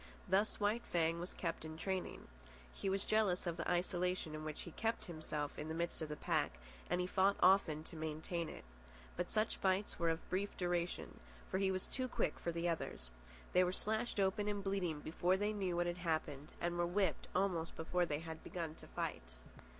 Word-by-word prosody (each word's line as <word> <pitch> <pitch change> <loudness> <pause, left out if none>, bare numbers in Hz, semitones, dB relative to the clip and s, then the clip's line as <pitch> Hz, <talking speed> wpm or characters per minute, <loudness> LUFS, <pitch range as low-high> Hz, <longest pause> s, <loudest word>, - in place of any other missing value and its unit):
Thus 200 +4 +3
White 210 +3 +2
Fang 165 -1 +2
was 175 +2 -4
kept 165 -3 -2
in 160 0 -6
training. 190 +2 -2 0.5
He 195 - -2
was 195 0 +1
jealous 210 -5 +3
of 170 -2 0
the 170 - -2
isolation 180 -2 +1
in 155 0 -4
which 155 -1 -4
he 170 - -7
kept 225 +6 -1
himself 155 -3 -3
in 150 - -3
the 160 - -2
midst 170 0 -1
of 155 - -2
the 150 - -2
pack, 65 - +1 0.3
and 180 - +2
he 180 - +2
fought 195 +2 +4
often 180 -5 +5
to 170 - -7
maintain 160 +2 -2
it. - - -8 0.5
But 180 - -1
such 215 +1 +1
fights 190 +2 +1
were 170 -1 +3
of 165 +1 -1
brief 200 +2 -1
duration. 175 -1 -1 0.4
He 190 0 +3
was 185 -1 -1
too 255 -1 -1
quick - - 0
for 170 - -1
the 170 +1 0
others. 110 - -2 0.4
They 180 - +7
were 180 - +2
slashed 215 +3 0
open 200 +2 +2
and 205 -1 -1
bleeding 185 -6 0
before 175 +4 +2
they 205 +2 +1
knew 190 -4 0
what 175 0 +2
had 175 0 -2
happened, 155 -4 -1
were 175 0 +1
whipped 180 -4 +1
almost 180 -3 +1
before 175 +2 +1
they 150 0 -1
had 160 -1 -7
begun 165 -3 -3
to - - -11
fight. - - -4
175 Hz, 200 wpm, -38 LUFS, 160-190 Hz, 0.5 s, They